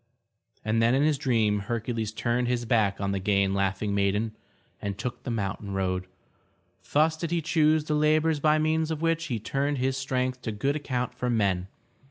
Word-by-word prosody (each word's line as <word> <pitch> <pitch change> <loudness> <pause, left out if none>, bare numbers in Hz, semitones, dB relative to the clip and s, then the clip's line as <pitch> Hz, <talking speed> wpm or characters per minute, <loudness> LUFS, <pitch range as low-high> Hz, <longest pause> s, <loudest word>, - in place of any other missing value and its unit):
And 110 +1 +2
then 115 +3 +4
in 140 - +3
his 150 -2 +2
dream 110 -5 +2
Hercules 110 +1 -3
turned 120 +2 0
his 120 -1 0
back 110 -5 +2
on 100 0 -1
the 100 - -1
gay 100 0 +2
and 95 0 0
laughing 100 +1 0
maiden 100 +3 0 0.5
and 100 -1 -3
took 125 -2 -4
the - - -6
mountain 100 -3 -3
road. 95 -1 -1 0.8
Thus 155 +2 +3
did 165 +1 -4
he 170 0 +1
choose 155 -1 +3
the 150 - -2
labors 155 +1 +3
by 155 +1 +4
means 155 +1 +1
of 160 0 -3
which 165 0 +1
he 125 -7 -2
turned 140 +6 -1
his 130 +1 0
strength 130 -1 -1
to 110 - -3
good 135 +7 -1
account 125 -4 -2
for 125 0 -2
men. 100 -6 +1
125 Hz, 195 wpm, -27 LUFS, 105-150 Hz, 0.8 s, then